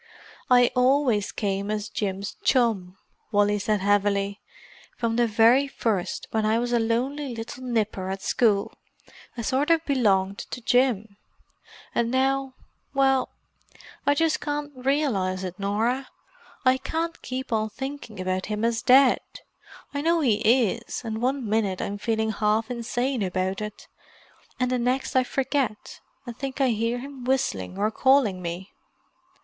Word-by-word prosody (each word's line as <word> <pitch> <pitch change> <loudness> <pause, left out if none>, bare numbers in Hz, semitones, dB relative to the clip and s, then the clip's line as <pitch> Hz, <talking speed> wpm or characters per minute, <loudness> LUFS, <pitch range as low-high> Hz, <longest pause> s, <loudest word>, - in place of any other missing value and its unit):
"I 245 -1 +5
always 250 -5 +2
came 200 -1 -2
as 210 0 -2
Jim's 200 -1 -3
chum," 210 -8 +1 0.3
Wally 205 0 +3
said 210 0 0
heavily. 200 0 +1 0.6
"From 230 -1 -1
the 240 0 +3
very 230 +5 +4
first, 215 -9 -2
when 220 -1 0
I 215 +1 +2
was 240 +1 -1
a 240 - +4
lonely 250 +4 -1
little 230 +3 -7
nipper 215 -6 -1
at 190 0 -4
school, 210 -4 +2 0.6
I 235 - -3
sort 270 +6 0
of 330 -1 +3
belonged 200 -8 +2
to - - -6
Jim. 230 -4 +1 0.8
And 235 -1 +1
now—well, 270 0 0 0.7
I 285 - +3
just 325 +1 +1
can't 295 0 -3
realize 250 -9 0
it, 185 +1 -6
Norah. 225 +7 -1 0.6
I 255 0 +5
can't 325 +5 -3
keep 255 -1 -4
on 215 0 0
thinking 265 -3 -7
about 185 0 -2
him 210 +1 -1
as 230 0 0
dead. 260 +1 +6 0.7
I 285 - -2
know 335 +2 +2
he 235 -8 +3
is, 235 0 +1
and 220 0 -3
one 260 -1 0
minute 205 -3 0
I'm 205 0 -4
feeling 220 0 0
half 220 +2 0
insane 245 +1 -2
about 185 +1 -1
it, 210 -1 -7 0.7
and 250 0 +1
the 250 - +1
next 250 +3 -1
I 260 - +5
forget, 260 -3 -2 0.3
and 240 -2 -7
think 270 +2 -5
I 270 -2 +3
hear 230 +1 0
him 270 0 -8
whistling 220 - -1
or 210 +2 +1
calling 250 -7 +3
me." 175 +2 -5
230 Hz, 145 wpm, -25 LUFS, 205-260 Hz, 0.8 s, dead